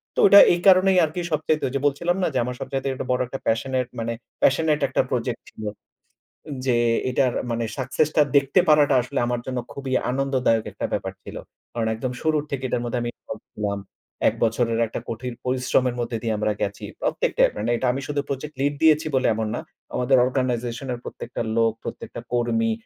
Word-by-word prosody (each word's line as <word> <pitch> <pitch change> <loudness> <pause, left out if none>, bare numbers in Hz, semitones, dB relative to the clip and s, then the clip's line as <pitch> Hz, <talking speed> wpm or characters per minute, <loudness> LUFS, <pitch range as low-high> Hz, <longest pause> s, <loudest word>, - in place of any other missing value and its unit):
তো - - -2
ওইটা 200 0 +9
এই 175 - 0
কারণেই 190 0 +6
আরকি 160 +4 -4
সবচাইতে 155 0 0
ওই 125 - -6
যে - - +1
বলছিলাম 170 +6 +1
না - - +3
যে, - - 0
আমার 125 0 -4
সবচাইতে 135 0 -3 0.2
বড় 125 - +1
একটা 135 +1 -6
প্যাশনেট 125 +2 0
মানে 115 +1 -2 0.3
প্যাশনেট 150 +2 +3
একটা - - +1
প্রজেক্ট - - -2
ছিল। 110 - -11 1.0
যে 125 -2 +3 0.3
এটার 125 -1 +2 0.2
মানে 115 0 -1
সাকসেস 135 +4 0
টা 150 - +6 0.2
দেখতে 140 +6 +3
পারাটা 145 -2 +5
আসলে 120 - -3
আমার 120 -1 -1
জন্য 130 -1 -2
খুবই 135 -2 -4 0.2
আনন্দদায়ক 130 -4 +1
একটা - - -4
ব্যাপার - - -2
ছিল। - - -8 0.4
কারণ 115 -2 -1
একদম 125 +3 -3
শুরুর 155 -2 +1
থেকে 135 -1 -3
এটার 120 - -1
মধ্যে 120 +1 -2
আমি 120 - -2
ইনভল্ভ - - -9
ছিলাম। 100 -1 -2 0.5
১ - - +3
বছরের 115 0 +1
একটা - - -5
কঠিন 120 +2 -4
পরিশ্রমের 125 -1 +1
মধ্যে 120 -1 -2
দিয়ে 110 -2 0
আমরা 105 0 0
গেছি। 100 0 -3 0.2
প্রত্যেকটাই, - - +2
মানে 110 +3 -2
এটা 130 - -1
আমি 135 - -3
শুধু 145 -1 -1
প্রজেক্ট 145 +2 -4
লিড 145 +1 +2
দিয়েছি 155 0 +5
বলে 130 - +2
এমন 110 -1 -2
না। - - -3 0.4
আমাদের 125 +1 +3
অর্গানাইজেশন 125 -1 -2
এর 120 - -6
প্রত্যেকটা 120 - -6 0.2
লোক, 115 -1 +4
প্রত্যেকটা 120 - -7
কর্মী 115 -2 +1
130 Hz, 190 wpm, -23 LUFS, 120-140 Hz, 1.0 s, ওইটা